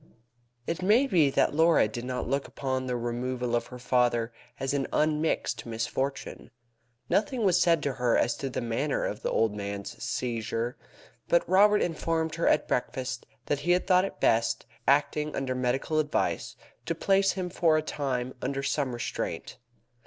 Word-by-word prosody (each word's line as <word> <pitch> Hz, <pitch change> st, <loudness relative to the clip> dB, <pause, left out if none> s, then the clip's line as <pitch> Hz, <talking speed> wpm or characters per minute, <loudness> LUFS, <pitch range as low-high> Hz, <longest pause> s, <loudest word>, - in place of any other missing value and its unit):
It 165 Hz, +5 st, -3 dB
may 215 Hz, +8 st, +4 dB
be 170 Hz, -, +3 dB
that 135 Hz, -, +2 dB
Laura 160 Hz, -5 st, +4 dB
did 120 Hz, +3 st, -6 dB
not 125 Hz, 0 st, -3 dB
look 140 Hz, +2 st, -1 dB
upon 130 Hz, -1 st, -3 dB
the 125 Hz, -, -1 dB
removal 120 Hz, +1 st, -2 dB
of 120 Hz, -, -1 dB
her 125 Hz, -, -9 dB
father 120 Hz, -2 st, +1 dB, 0.3 s
as 135 Hz, 0 st, -1 dB
an 140 Hz, -2 st, 0 dB
unmixed 155 Hz, +1 st, 0 dB
misfortune. 120 Hz, +4 st, -3 dB, 0.6 s
Nothing 220 Hz, +3 st, +1 dB
was 180 Hz, -1 st, +4 dB
said 165 Hz, -3 st, +3 dB
to 140 Hz, -, 0 dB
her 125 Hz, -2 st, +2 dB
as 120 Hz, -, +1 dB
to 135 Hz, -, -3 dB
the 130 Hz, -, -3 dB
manner 120 Hz, +5 st, -1 dB
of -, -, -4 dB
the -, -, -1 dB
old 110 Hz, -2 st, +2 dB
man's 100 Hz, -1 st, -6 dB
seizure, 115 Hz, 0 st, -2 dB, 0.5 s
but 170 Hz, -, +3 dB
Robert 205 Hz, +3 st, +5 dB
informed 160 Hz, -1 st, -1 dB
her 165 Hz, 0 st, 0 dB
at -, -, +3 dB
breakfast 130 Hz, 0 st, -2 dB, 0.2 s
that 145 Hz, -, 0 dB
he 175 Hz, +5 st, +2 dB
had 180 Hz, -, +1 dB
thought 185 Hz, -1 st, +4 dB
it -, -, -7 dB
best, 115 Hz, 0 st, +2 dB, 0.2 s
acting 150 Hz, +2 st, +2 dB
under 130 Hz, -1 st, -1 dB
medical 130 Hz, +5 st, 0 dB
advice, 150 Hz, -1 st, -1 dB, 0.3 s
to -, -, 0 dB
place 195 Hz, 0 st, +3 dB
him 180 Hz, -2 st, -4 dB
for 165 Hz, -3 st, +3 dB
a 155 Hz, -, 0 dB
time 130 Hz, -4 st, -2 dB
under 135 Hz, +1 st, -2 dB
some 135 Hz, -2 st, -1 dB
restraint. 120 Hz, -, -4 dB
135 Hz, 170 wpm, -28 LUFS, 125-165 Hz, 0.6 s, Robert